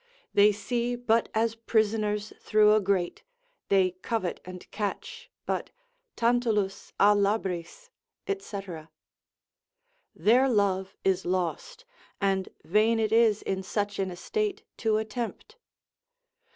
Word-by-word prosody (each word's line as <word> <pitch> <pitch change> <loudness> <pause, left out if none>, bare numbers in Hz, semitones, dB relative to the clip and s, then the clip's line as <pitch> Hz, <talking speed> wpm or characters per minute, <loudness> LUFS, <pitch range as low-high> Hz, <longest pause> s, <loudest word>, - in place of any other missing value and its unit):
They 205 +1 +6
see 240 +4 -2
but 235 -1 +1
as 225 +1 +2
prisoners 215 -2 0
through 210 -1 +4
a 215 - +4
grate, 190 -3 0 0.5
they 190 -2 +4
covet 215 -6 -2
and 180 0 -9
catch, 460 - -5 0.2
but - - -2 0.5
Tantalus 230 -5 0
a 205 +1 +6
labris, 200 - -2 0.4
&c. 390 - -3 1.6
Their 250 +5 +4
love 195 -4 +1
is 190 -1 +1
lost, 180 - -3 0.3
and 195 -1 0
vain 215 +5 +3
it 215 -1 0
is 225 -2 +4
in 190 0 -2
such 205 +1 -3
an 190 -1 0
estate 410 - -3
to 220 -2 +1
attempt. 230 - -5
210 Hz, 110 wpm, -28 LUFS, 195-230 Hz, 1.6 s, They